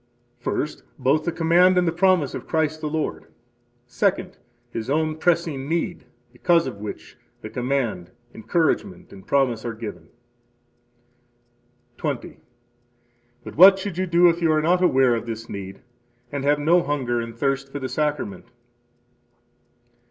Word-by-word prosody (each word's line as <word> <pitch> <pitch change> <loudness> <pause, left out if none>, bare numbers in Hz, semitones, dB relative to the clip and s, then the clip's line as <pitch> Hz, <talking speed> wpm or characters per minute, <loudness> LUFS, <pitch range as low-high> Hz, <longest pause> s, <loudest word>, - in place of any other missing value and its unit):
First, 145 +4 -3 0.2
both 140 +4 +1
the 170 - 0
command 175 +3 +4
and 180 -1 +3
the - - +2
promise 175 -4 +2
of - - -7
Christ 155 -1 0
the 150 - -2
Lord. 155 0 -3 0.6
Second, 180 +9 -1 0.4
his 115 +1 -5
own 155 +2 0
pressing 160 -4 0
need, 170 +1 -2 0.3
because 170 -2 +2
of - - -5
which 105 0 -8 0.2
the 110 - -8
command, 120 -8 -2 0.2
encouragement, 115 - -1
and 95 -1 -14
promise 130 -5 +1
are 115 -2 -4
given. 105 -8 -8 1.9
20. 145 -6 -4 1.0
But - - -9
what 190 +4 +9
should 190 -2 -5
you 185 - 0
do 170 +1 +5
if 170 0 +2
you 165 -2 +3
are 155 - +3
not 180 +3 +3
aware 130 -7 +4
of 115 0 -3
this 115 0 -6
need 95 -1 -8 0.5
and 140 -1 -3
have 145 +1 +3
no 165 +5 +3
hunger 130 -6 -1
and 115 0 -8
thirst 135 0 -1
for 145 - -5
the 130 -2 -4
Sacrament? 145 -11 -2
145 Hz, 145 wpm, -23 LUFS, 120-170 Hz, 1.9 s, what